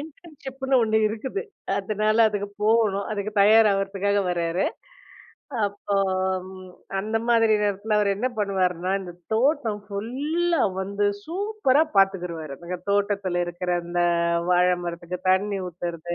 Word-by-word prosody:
இன்டர்ன்ஷிப்னு 280 Hz, -5 st, -4 dB
ஒண்ணு 220 Hz, -1 st, +1 dB
இருக்குது, 260 Hz, -, -4 dB, 0.4 s
அதனால 215 Hz, 0 st, 0 dB
அதுக்கு 205 Hz, -1 st, -3 dB
போகணும், 210 Hz, -2 st, +2 dB
அதுக்கு 210 Hz, 0 st, -3 dB
தயார் 220 Hz, +2 st, +6 dB
ஆவறதுக்காக 195 Hz, +1 st, 0 dB
வராரு. 170 Hz, +1 st, 0 dB, 1.0 s
அப்போம் 190 Hz, -2 st, -1 dB, 0.5 s
அந்த 215 Hz, +3 st, -1 dB
மாதிரி 225 Hz, -2 st, +4 dB
நேரத்துல 205 Hz, +1 st, 0 dB
அவர் 205 Hz, -1 st, +2 dB
என்ன 235 Hz, +6 st, -1 dB
பண்ணுவாருன்னா, 185 Hz, -3 st, 0 dB
இந்த 180 Hz, -2 st, -8 dB, 0.2 s
தோட்டம் 230 Hz, -3 st, +1 dB
ஃபுல்லா 285 Hz, +12 st, -1 dB, 0.2 s
வந்து 200 Hz, +2 st, -1 dB, 0.2 s
சூப்பரா 370 Hz, -5 st, +1 dB
பார்த்துக்கிருவாரு. 180 Hz, -6 st, +1 dB
அந்த 180 Hz, +1 st, -4 dB
தோட்டத்துல 200 Hz, -3 st, 0 dB
இருக்கிற 175 Hz, +1 st, -4 dB
அந்த 175 Hz, 0 st, -1 dB, 0.5 s
வாழை 180 Hz, 0 st, +4 dB
மரத்துக்கு 175 Hz, +1 st, -5 dB
தண்ணி 200 Hz, +2 st, +1 dB
ஊத்துறது, 175 Hz, 0 st, -5 dB
200 Hz, 115 wpm, -24 LUFS, 185-225 Hz, 1.0 s, தயார்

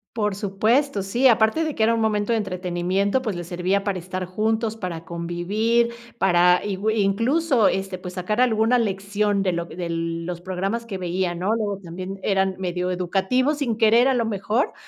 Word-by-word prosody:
Por 210 Hz, -3 st, 0 dB
supuesto, 215 Hz, +4 st, +1 dB
sí, 240 Hz, +7 st, +3 dB
aparte 225 Hz, +6 st, +3 dB
de 310 Hz, -2 st, -3 dB
que 220 Hz, -, +1 dB
era 225 Hz, +1 st, +4 dB
un 230 Hz, -, 0 dB
momento 210 Hz, 0 st, 0 dB
de 225 Hz, -, +2 dB
entretenimiento, 185 Hz, +3 st, -1 dB
pues 215 Hz, -7 st, -3 dB
les 175 Hz, 0 st, -5 dB
servía 185 Hz, +3 st, 0 dB
para 200 Hz, -2 st, -2 dB
estar 185 Hz, +1 st, -5 dB
juntos, 220 Hz, +4 st, -1 dB
para 175 Hz, -6 st, -6 dB
convivir, 200 Hz, +8 st, 0 dB, 0.3 s
para 180 Hz, -3 st, +4 dB
igüi 210 Hz, +2 st, 0 dB
incluso, 235 Hz, +5 st, +2 dB
este, 190 Hz, -1 st, -2 dB
pues, 180 Hz, 0 st, -8 dB
sacar 210 Hz, +5 st, -1 dB
alguna 235 Hz, 0 st, +3 dB
lección 200 Hz, -1 st, 0 dB
de 185 Hz, -, +1 dB
lo 170 Hz, -1 st, -2 dB
de 170 Hz, 0 st, -6 dB
los 165 Hz, +1 st, -3 dB
programas 195 Hz, +5 st, -3 dB
que 200 Hz, -4 st, -4 dB
veían, 180 Hz, -1 st, -2 dB
¿no?, 195 Hz, +5 st, +1 dB
luego 210 Hz, -3 st, -2 dB
también 185 Hz, +3 st, -7 dB
eran 190 Hz, -1 st, +1 dB
medio 180 Hz, -1 st, -2 dB
educativos 195 Hz, -, 0 dB
sin 235 Hz, -7 st, -1 dB
querer 230 Hz, +2 st, +5 dB
a 265 Hz, -, +2 dB
lo 235 Hz, -2 st, +1 dB
mejor, 215 Hz, +4 st, -1 dB
195 Hz, 180 wpm, -23 LUFS, 180-225 Hz, 0.3 s, querer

